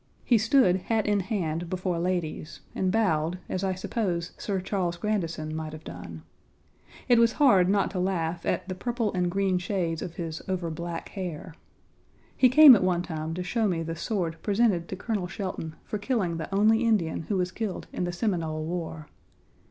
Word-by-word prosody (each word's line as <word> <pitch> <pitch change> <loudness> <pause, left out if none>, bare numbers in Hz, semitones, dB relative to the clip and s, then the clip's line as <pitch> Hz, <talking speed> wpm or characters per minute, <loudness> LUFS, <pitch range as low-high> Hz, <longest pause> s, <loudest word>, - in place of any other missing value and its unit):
He 235 -3 +4
stood 220 -4 +4
hat 220 +3 -1
in 205 -1 +2
hand 175 -5 -2
before 185 -1 -2
ladies 170 -3 -3
and 185 -1 0
bowed 175 -6 +1
as 185 - -3
I 190 -1 0
suppose 180 -3 -2
Sir 195 -2 -2
Charles 180 -2 -2
Grandison 170 -6 -2
might 155 -1 -5
have 155 - -9
done. 85 -2 -9 0.8
It 240 -1 +5
was 230 -1 +4
hard 200 -11 +5
not 200 0 +2
to 185 - -3
laugh 175 -2 -1
at - - -1
the 185 - -3
purple 235 +2 -2
and 180 -1 +1
green 190 0 +1
shades 180 -3 -2
of 175 -3 -6
his 165 -2 -5
overblack 170 -2 -4
hair. 180 -4 -6 0.8
He 255 - +5
came 280 0 +10
at 195 - +1
one 180 -1 +1
time 160 -2 -4
to 180 - -3
show 220 +4 0
me 170 -4 -1
the 165 0 -4
sword 170 -2 -2
presented 200 -5 +2
to - - -5
Colonel 200 -2 -2
Shelton 180 -4 -5
for 210 - -4
killing 200 -7 -1
the 160 - -6
only 220 +4 +4
Indian 180 -9 +1
who 200 - +1
was 180 0 0
killed 210 -1 -4
in - - -2
the 175 - -1
Seminole 165 -5 -2
war. 160 -2 -5
180 Hz, 185 wpm, -27 LUFS, 165-205 Hz, 0.8 s, came